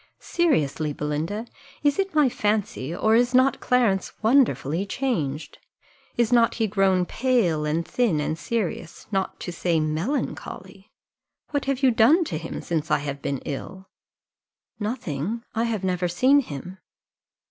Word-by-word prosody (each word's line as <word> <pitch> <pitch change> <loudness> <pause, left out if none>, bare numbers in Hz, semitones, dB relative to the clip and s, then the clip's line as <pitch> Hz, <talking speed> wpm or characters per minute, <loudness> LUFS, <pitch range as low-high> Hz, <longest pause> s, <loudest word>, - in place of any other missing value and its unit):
Seriously, 155 - 0
Belinda, 155 +10 -3 0.4
is 290 +4 +2
it 390 -4 -1
my 300 -3 +5
fancy, 210 - -1
or 220 +4 +2
is 245 +2 +3
not 260 +1 +4
Clarence 235 -7 +1
wonderfully 195 - +3
changed? 195 - -3 0.6
Is 235 0 +2
not 235 -1 +4
he 225 - +1
grown 195 -3 +2
pale, 205 -11 +1
and 160 +2 -1
thin, 225 -11 +1
and 150 +1 -1
serious, 175 -3 -4
not 195 -2 -2
to 175 - -4
say 170 -1 0
melancholy? 160 - -3 0.6
What 285 -2 -1
have 275 0 -1
you 260 - +6
done 250 +10 +5
to 165 - -4
him 165 - -6
since 160 -1 -2
I - - +4
have 140 -1 -5
been 140 -1 -3
ill?" 185 +7 -6 0.9
"Nothing 210 - -3
I 225 +1 0
have 220 -4 -2
never 180 -1 0
seen 255 +11 +4
him." 180 - -6
195 Hz, 145 wpm, -24 LUFS, 160-245 Hz, 0.9 s, you